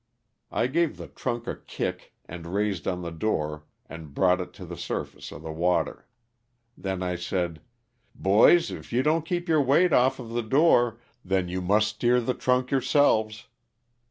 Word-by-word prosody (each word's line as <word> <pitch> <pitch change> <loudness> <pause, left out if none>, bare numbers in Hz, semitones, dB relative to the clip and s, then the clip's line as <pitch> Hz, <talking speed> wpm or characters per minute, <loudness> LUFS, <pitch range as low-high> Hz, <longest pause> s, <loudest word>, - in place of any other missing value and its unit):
I 115 - +1
gave 165 +5 0
the - - -7
trunk 120 -2 -4
a - - -3
kick - - -5
and 85 +2 -7
raised 100 -2 -1
on 90 -2 -2
the 85 - -5
door 75 -4 -2 0.2
and 80 -4 -10
brought 90 -1 +3
it 90 - -7
to - - -10
the - - -7
surface - - -5
of 75 - -10
the 80 - -5
water. 85 0 -1 0.7
Then 95 -1 -4
I 90 0 -1
said, 90 -3 -3 0.6
''boys 110 - +5
if - - -12
you 125 +2 +2
don't 155 +2 +1
keep 175 0 -2
your 160 -2 +3
weight 150 +6 +3
off 130 +2 +4
of 120 -3 -8
the 120 +1 -1
door, 120 -2 +3 0.2
then 95 -1 0
you 90 +1 -3
must 105 +4 +3
steer 120 +3 +2
the 125 +1 -1
trunk 125 0 0
yourseUes." 110 -6 +2
110 Hz, 175 wpm, -26 LUFS, 90-130 Hz, 0.7 s, boys